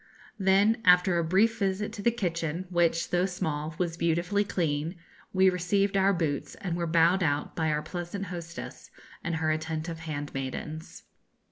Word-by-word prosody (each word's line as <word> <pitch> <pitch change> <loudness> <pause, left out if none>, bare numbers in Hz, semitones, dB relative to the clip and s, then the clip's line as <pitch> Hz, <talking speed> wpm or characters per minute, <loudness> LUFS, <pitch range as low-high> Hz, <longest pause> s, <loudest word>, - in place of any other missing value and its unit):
Then, 200 +4 +4
after 180 -1 +5
a - - +1
brief 205 +7 +2
visit 200 +1 -1
to 215 - -6
the 235 - +4
kitchen, 170 -6 -2
which, 170 -1 +1
though 180 +1 +2
small, 155 -4 -3
was 170 -2 -1
beautifully 170 +5 +1
clean, 165 -3 -1 0.4
we 190 0 +4
received 195 +2 +1
our 195 0 +4
boots, 160 -6 -2
and 180 -4 -3
were 170 -1 -1
bowed 170 +3 +4
out 145 -3 0
by 160 -1 0
our 150 0 0
pleasant 180 +3 -5
hostess 170 -1 -8 0.3
and 170 - -1
her 160 -1 +1
attentive 160 +1 -3
handmaidens. 150 0 -5
170 Hz, 155 wpm, -28 LUFS, 160-190 Hz, 0.4 s, after